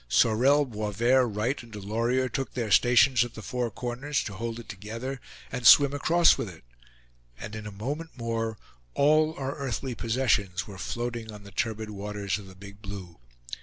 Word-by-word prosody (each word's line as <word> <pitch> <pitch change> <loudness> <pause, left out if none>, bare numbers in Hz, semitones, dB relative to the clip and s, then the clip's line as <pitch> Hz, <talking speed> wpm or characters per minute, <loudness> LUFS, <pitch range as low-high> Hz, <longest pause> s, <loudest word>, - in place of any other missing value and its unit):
Sorel, 125 - +4
Boisverd, 115 +1 +1
Wright 115 +7 -1
and 120 -1 -15
Delorier 115 +5 0
took 135 +2 -4
their 115 -4 -2
stations 120 +2 +5
at 120 - -8
the 110 - -8
four 125 +4 -2
corners, 125 +6 -3
to 105 - -6
hold 115 +3 -4
it 115 - -11
together, 115 +7 -6 0.3
and 125 -2 +1
swim 140 -1 +8
across 165 +4 +4
with 105 - -3
it; 80 -3 -14 0.8
and 110 - -7
in 105 -1 -6
a - - -6
moment 145 +11 -5
more, 115 -2 -2 0.4
all 155 +2 +4
our 135 +1 -3
earthly 135 -1 -3
possessions 110 -5 0
were 100 -4 -10
floating 120 0 -4
on 105 -1 -11
the 100 - -12
turbid 110 +1 -2
waters 100 -1 -3
of 100 - -11
the 95 - -13
Big 100 +2 -12
Blue. 95 - -8
115 Hz, 175 wpm, -27 LUFS, 105-130 Hz, 0.8 s, swim